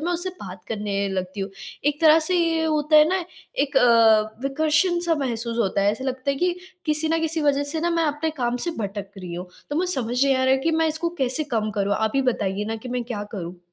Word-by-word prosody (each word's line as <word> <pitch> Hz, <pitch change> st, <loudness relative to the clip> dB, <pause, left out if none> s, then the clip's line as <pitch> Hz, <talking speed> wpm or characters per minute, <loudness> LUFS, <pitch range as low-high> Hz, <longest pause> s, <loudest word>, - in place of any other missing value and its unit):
तो -, -, -2 dB
मैं 355 Hz, -, +1 dB
उससे 350 Hz, +2 st, -2 dB
बात 180 Hz, -1 st, -9 dB
करने 205 Hz, -2 st, -2 dB
लगती 190 Hz, +1 st, -4 dB
हूँ। 195 Hz, -, -3 dB, 0.3 s
एक 295 Hz, 0 st, 0 dB
तरह 315 Hz, 0 st, +7 dB
से 365 Hz, -, +3 dB
ये 330 Hz, -2 st, +1 dB
होता 305 Hz, -1 st, +2 dB
है 305 Hz, +1 st, +7 dB
ना 370 Hz, 0 st, 0 dB, 0.3 s
एक 285 Hz, -, 0 dB
अ, 225 Hz, -2 st, +4 dB
विकर्षण 315 Hz, +6 st, +2 dB
सा 330 Hz, -, +3 dB
महसूस 235 Hz, -1 st, -3 dB
होता 200 Hz, -3 st, +1 dB
है। 200 Hz, -, +4 dB
ऐसा 260 Hz, +4 st, -6 dB
लगता 260 Hz, +1 st, -2 dB
है 275 Hz, -, -1 dB
कि 355 Hz, +4 st, 0 dB, 0.3 s
किसी 305 Hz, +1 st, +1 dB
न 325 Hz, -, +1 dB
किसी 320 Hz, 0 st, 0 dB
वजह 285 Hz, -1 st, +2 dB
से 320 Hz, -, -2 dB
ना 345 Hz, +1 st, 0 dB
मैं 335 Hz, -1 st, +1 dB
अपने 300 Hz, +2 st, -1 dB
काम 240 Hz, 0 st, 0 dB
से -, -, +1 dB
भटक 200 Hz, -1 st, -4 dB
रही 180 Hz, -2 st, -7 dB
हूँ, 180 Hz, +1 st, -6 dB, 0.2 s
तो 290 Hz, -, -1 dB
मुझे 360 Hz, +1 st, +1 dB
समझ 245 Hz, 0 st, 0 dB
नहीं 275 Hz, -1 st, +3 dB
आ 260 Hz, -, +1 dB
रहा 260 Hz, -, +4 dB
है -, -, +1 dB
कि 325 Hz, +4 st, +1 dB
मैं 320 Hz, 0 st, +2 dB
इसको 315 Hz, +2 st, -1 dB
कैसे 265 Hz, +3 st, 0 dB
कम 215 Hz, -1 st, 0 dB
करूँ? 200 Hz, 0 st, 0 dB
आप 220 Hz, 0 st, 0 dB
ही 270 Hz, -, +3 dB
बताइए 200 Hz, 0 st, -2 dB
ना 225 Hz, +1 st, -3 dB
कि 250 Hz, +3 st, -9 dB
मैं 245 Hz, -1 st, -2 dB
क्या 230 Hz, -4 st, -4 dB
करूँ? 180 Hz, -1 st, -6 dB
260 Hz, 260 wpm, -23 LUFS, 215-315 Hz, 0.3 s, तरह